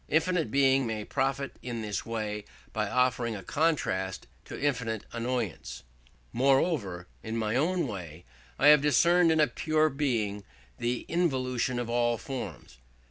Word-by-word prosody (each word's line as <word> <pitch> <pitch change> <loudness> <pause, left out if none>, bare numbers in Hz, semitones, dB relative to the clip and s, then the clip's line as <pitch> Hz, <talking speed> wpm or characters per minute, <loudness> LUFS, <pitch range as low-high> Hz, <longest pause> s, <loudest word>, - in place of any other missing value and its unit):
Infinite 165 +1 +1
Being 135 -2 +3
may 110 -2 -3
profit 135 0 -1
in 120 -2 -4
this 105 0 -3
way 105 -2 -3 0.3
by 105 -2 -1
offering 125 -2 +1
a 100 - -7
contrast 95 - 0 0.2
to - - -8
infinite 125 -7 -1
annoyance. 115 - -3 0.5
Moreover, 125 - +1
in 110 +1 -4
my 110 0 -1
own 170 +6 +1
way, 90 -6 -7 0.3
I - - +6
have 150 -1 +8
discerned 170 +5 +4
in 155 -2 +4
pure 155 0 +1
Being 115 -9 -1 0.4
the 120 +1 -1
involution 130 -7 0
of 120 -1 -2
all 120 0 +1
forms. 125 - -7
125 Hz, 135 wpm, -29 LUFS, 110-145 Hz, 0.5 s, have